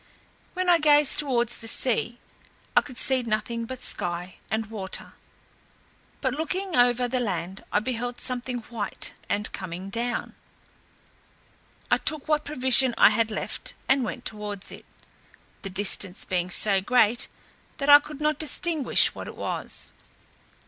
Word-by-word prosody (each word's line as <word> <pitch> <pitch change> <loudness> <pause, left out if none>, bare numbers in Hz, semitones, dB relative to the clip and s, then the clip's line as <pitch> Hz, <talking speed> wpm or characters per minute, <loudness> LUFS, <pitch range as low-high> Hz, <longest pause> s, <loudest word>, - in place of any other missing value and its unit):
When 370 0 -1
I 345 -1 +5
gazed 295 -2 +4
towards 240 -5 +1
the 225 - -8
sea 240 0 +1 0.6
I - - +7
could 255 -4 -11
see 260 0 +4
nothing 230 0 -2
but 260 0 -3
sky 175 +1 -2
and 220 +2 -1
water; 200 -3 -5 1.1
but - - 0
looking 360 +4 -3
over 245 0 +3
the 255 +1 -1
land 190 -4 -4
I 205 - +2
beheld 245 +1 -4
something 250 -1 +3
white; 225 -2 -5 0.2
and 210 +1 -1
coming 185 +1 -6
down, 240 +2 -3 1.6
I - - +4
took 305 -2 -1
what 305 -1 +1
provision 260 -3 +3
I - - +8
had 220 +1 +1
left, 215 - -5
and 265 0 +3
went 245 +2 -5
towards 210 -2 -3
it, - - -12 0.8
the 195 - -6
distance 190 -1 -1
being 180 -1 -1
so 195 +1 +4
great, 235 +1 +3 0.5
that 280 -2 -3
I 290 0 +10
could 295 0 -10
not 300 -1 0
distinguish 310 0 +2
what - - -8
it - - -9
was. - - -3
240 Hz, 145 wpm, -25 LUFS, 210-270 Hz, 1.6 s, I